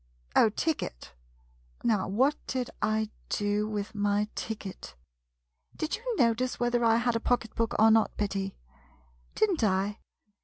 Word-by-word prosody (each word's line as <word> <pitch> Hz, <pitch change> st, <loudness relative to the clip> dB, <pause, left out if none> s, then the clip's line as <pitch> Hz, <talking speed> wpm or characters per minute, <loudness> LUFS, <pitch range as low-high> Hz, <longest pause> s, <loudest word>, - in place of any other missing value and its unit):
Oh, 220 Hz, -, +6 dB
ticket 210 Hz, -, -3 dB, 0.3 s
— -, -, -32 dB
now 210 Hz, -5 st, +2 dB
what 260 Hz, +10 st, +2 dB
did 255 Hz, -2 st, -2 dB
I 215 Hz, 0 st, 0 dB, 0.2 s
do 205 Hz, +1 st, 0 dB
with 210 Hz, +1 st, -3 dB
my 205 Hz, 0 st, +1 dB
ticket? 210 Hz, -, -6 dB, 0.8 s
Did 315 Hz, -, -2 dB
you 475 Hz, +1 st, -3 dB
notice 245 Hz, +1 st, +2 dB
whether 240 Hz, 0 st, +1 dB
I 225 Hz, -1 st, +5 dB
had 240 Hz, 0 st, +1 dB
a -, -, +2 dB
pocket 230 Hz, -2 st, 0 dB
book 230 Hz, -1 st, -1 dB
or 220 Hz, +1 st, +6 dB
not, 220 Hz, 0 st, +3 dB
Betty? 195 Hz, -1 st, -2 dB, 0.8 s
Did 435 Hz, -2 st, +3 dB
n't 320 Hz, -10 st, -1 dB
I 200 Hz, +1 st, +1 dB
220 Hz, 150 wpm, -29 LUFS, 205-240 Hz, 0.8 s, Oh